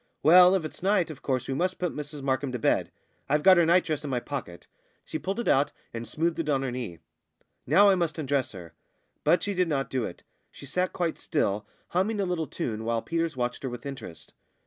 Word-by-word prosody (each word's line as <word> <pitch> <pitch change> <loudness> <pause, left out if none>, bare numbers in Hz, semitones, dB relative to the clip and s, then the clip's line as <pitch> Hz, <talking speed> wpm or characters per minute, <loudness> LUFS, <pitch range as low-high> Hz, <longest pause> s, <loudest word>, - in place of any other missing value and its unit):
"Well, 180 +4 +8
if 180 -4 -1
it's 155 - -8
night, 190 -3 +2
of 140 - -11
course 130 -3 -1
we 135 - -1
must 180 +6 0
put 180 -2 -2
Mrs 145 -1 -6
Markham 130 0 0
to - - -1
bed. - - +1 0.4
I've 150 +1 +2
got 190 -1 +8
her 170 -2 +4
nightdress 165 -3 +2
in 145 - -4
my 125 -2 0
pocket." 120 -10 -6 0.4
She 155 - -4
pulled 195 +4 -3
it 235 - -3
out 140 +2 +3 0.2
and 115 0 -5
smoothed 165 +1 -1
it 160 -2 -1
on 135 -2 +1
her 130 - -2
knee. 120 -9 -5 0.7
"Now, 205 +1 +6
I - - +5
must 170 -4 -1
undress 140 -4 -1
her." 85 -4 -10 0.5
But 175 - +3
she 205 - -1
did 180 -1 +1
not 140 -4 -1
do 130 -2 0
it; 85 - -8 0.3
she - - -12
sat 180 +7 -1
quite 170 -3 -2
still, 105 -8 -1 0.2
humming 200 +4 0
a 200 - +1
little 175 -4 -2
tune, 110 -3 -4
while 115 0 -1
Peters 165 -3 -2
watched 125 0 -2
her 130 - -3
with 120 +1 -8
interest. 135 - -8
150 Hz, 225 wpm, -27 LUFS, 130-175 Hz, 0.7 s, Well